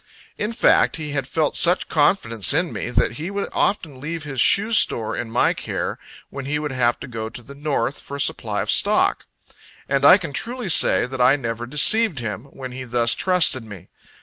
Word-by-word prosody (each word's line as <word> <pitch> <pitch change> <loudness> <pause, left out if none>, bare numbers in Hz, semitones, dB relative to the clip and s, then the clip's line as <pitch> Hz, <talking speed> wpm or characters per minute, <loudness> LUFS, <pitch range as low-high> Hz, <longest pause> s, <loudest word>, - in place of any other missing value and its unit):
In 210 +2 -3
fact, 230 - +2
he 155 -3 -6
had 135 -3 -3
felt 155 +1 -1
such 175 +1 +3
confidence 145 - +1
in 170 +1 0
me, - - -5
that 120 -1 0
he 160 +4 -5
would 200 0 -4
often 150 -10 -2
leave 160 +2 -5
his 135 -4 -3
shoe 210 +9 +3
store 115 - +2
in 115 - -5
my 120 - +1
care, - - -5 0.3
when 140 -1 -7
he 150 +2 -2
would 150 -1 -4
have 120 -2 0
to - - -7
go 110 -3 -6
to 120 +1 -10
the 140 - -13
north, 145 -1 -3
for 140 - -8
a - - -10
supply 140 - 0
of - - -2
stock. - - +2 0.6
And 140 0 -1
I 145 - +8
can 165 -7 -7
truly 240 - -3
say, 160 - +3
that 130 0 -5
I 130 +3 +5
never 120 -3 -5
deceived 175 - +4
him, 115 -1 -5
when 135 -2 -10
he 130 +1 -7
thus 120 -1 +1
trusted 180 -9 +1
me. 100 -4 -13
140 Hz, 205 wpm, -21 LUFS, 120-165 Hz, 0.6 s, I